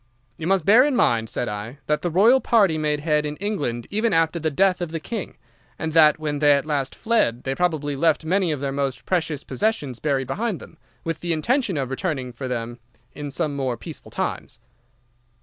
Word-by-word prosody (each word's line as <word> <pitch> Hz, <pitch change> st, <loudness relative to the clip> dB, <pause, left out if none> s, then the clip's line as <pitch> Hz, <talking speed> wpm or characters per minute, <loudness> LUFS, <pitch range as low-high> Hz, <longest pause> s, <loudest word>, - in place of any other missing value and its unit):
"'You 160 Hz, -, -5 dB
must 190 Hz, -3 st, +2 dB
bear 220 Hz, +6 st, +7 dB
in 285 Hz, -2 st, +1 dB
mind,' 115 Hz, -, +2 dB
said 120 Hz, -, -2 dB
I, 105 Hz, +5 st, -5 dB
'that 150 Hz, 0 st, 0 dB
the 175 Hz, -, -1 dB
Royal 220 Hz, +10 st, +5 dB
party 205 Hz, -9 st, +3 dB
made 150 Hz, -1 st, 0 dB
head 150 Hz, -1 st, +1 dB
in 150 Hz, 0 st, -4 dB
England 145 Hz, -, -2 dB
even 220 Hz, +3 st, +1 dB
after 165 Hz, +1 st, +2 dB
the 160 Hz, 0 st, 0 dB
death 185 Hz, +5 st, +2 dB
of 175 Hz, -, -2 dB
the 165 Hz, 0 st, -4 dB
King, 215 Hz, +4 st, -5 dB, 0.4 s
and 160 Hz, -1 st, -3 dB
that 155 Hz, -2 st, +6 dB
when 150 Hz, -2 st, -3 dB
they 145 Hz, -1 st, +6 dB
at 140 Hz, 0 st, +1 dB
last 140 Hz, -3 st, -2 dB
fled 220 Hz, -, +1 dB
they 135 Hz, -, -1 dB
probably 150 Hz, -3 st, 0 dB
left 160 Hz, +2 st, +2 dB
many 185 Hz, 0 st, +1 dB
of 145 Hz, -3 st, -3 dB
their 140 Hz, -1 st, -1 dB
most 135 Hz, -1 st, -2 dB
precious 160 Hz, -5 st, -1 dB
possessions 150 Hz, -, -2 dB
buried 140 Hz, -3 st, 0 dB
behind 200 Hz, -, -2 dB
them, -, -, -14 dB, 0.2 s
with 165 Hz, -1 st, -3 dB
the 175 Hz, -1 st, -1 dB
intention 210 Hz, -, 0 dB
of 135 Hz, -2 st, -2 dB
returning 135 Hz, -4 st, -3 dB
for 130 Hz, +2 st, -5 dB
them 120 Hz, -1 st, -4 dB, 0.3 s
in 145 Hz, -1 st, -6 dB, 0.2 s
more 135 Hz, -4 st, -2 dB
peaceful -, -, -10 dB
times. -, -, -4 dB
155 Hz, 200 wpm, -23 LUFS, 135-185 Hz, 0.4 s, bear